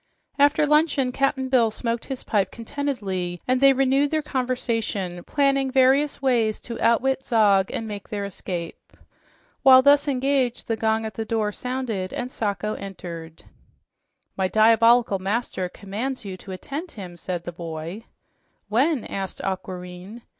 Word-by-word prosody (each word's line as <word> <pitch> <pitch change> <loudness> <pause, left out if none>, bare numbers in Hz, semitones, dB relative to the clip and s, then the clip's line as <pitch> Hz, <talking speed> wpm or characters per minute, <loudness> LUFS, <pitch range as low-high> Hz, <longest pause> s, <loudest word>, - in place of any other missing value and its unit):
After 290 +1 +4
luncheon 300 -3 +2
Cap'n 270 0 0
Bill 250 -4 +3
smoked 230 +1 -3
his 265 -2 -6
pipe 205 -3 0
contentedly, 210 -9 -3
and 255 +1 +2
they 275 0 +8
renewed 270 +2 +2
their 310 0 0
conversation, 225 -9 -2
planning 275 -2 +2
various 270 +3 +3
ways 230 -5 +2
to 235 - -7
outwit 260 +4 +2
Zog 205 -6 +3
and 225 - -4
make 205 -2 -7
their 205 -1 -3
escape. 180 -3 -6 0.7
While 260 -1 +8
thus 285 +1 +5
engaged, 265 -2 0
the 225 - 0
gong 220 0 0
at 220 - -5
the 225 - -3
door 220 -1 -1
sounded 235 -6 -4
and 250 +1 -4
Sacho 210 -1 -2
entered. 170 -4 -8 0.9
"My 190 -1 +1
diabolical 225 0 +4
master 195 -2 -2
commands 215 +7 -5
you 190 -2 -5
to 190 +1 -11
attend 290 - -6
him," 185 -5 -8
said 175 0 -5
the 175 - -5
boy. 170 +5 -7 0.6
"When?" 260 +5 +2
asked 195 -2 -5
Aquareine. 185 +3 -6
225 Hz, 145 wpm, -24 LUFS, 195-265 Hz, 0.9 s, they